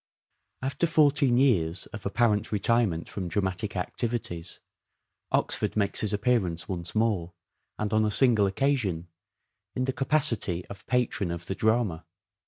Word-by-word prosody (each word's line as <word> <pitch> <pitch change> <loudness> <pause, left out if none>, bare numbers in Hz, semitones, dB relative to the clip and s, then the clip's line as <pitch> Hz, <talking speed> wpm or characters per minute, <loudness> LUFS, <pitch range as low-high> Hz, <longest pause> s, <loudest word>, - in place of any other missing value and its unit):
After 135 +5 0
fourteen 145 -5 +4
years 95 -11 +2
of 105 -3 -5
apparent 105 0 +1
retirement 105 -5 +1
from 95 -3 -5
dramatic 95 +2 -2
activities, 90 -3 -3 0.7
Oxford - - 0
makes 100 -2 +1
his 105 - -1
appearance 100 -6 0
once 85 -2 -6
more, 105 -6 0 0.4
and 105 0 -2
on 110 0 +3
a 105 - +1
single 110 -2 +4
occasion, 95 -7 -1 0.7
in 130 - 0
the 130 - -1
capacity 130 - +1
of 100 -1 -11
patron 120 -7 0
of 85 0 -5
the 95 - -3
drama. 110 -5 0
105 Hz, 135 wpm, -27 LUFS, 90-120 Hz, 0.7 s, fourteen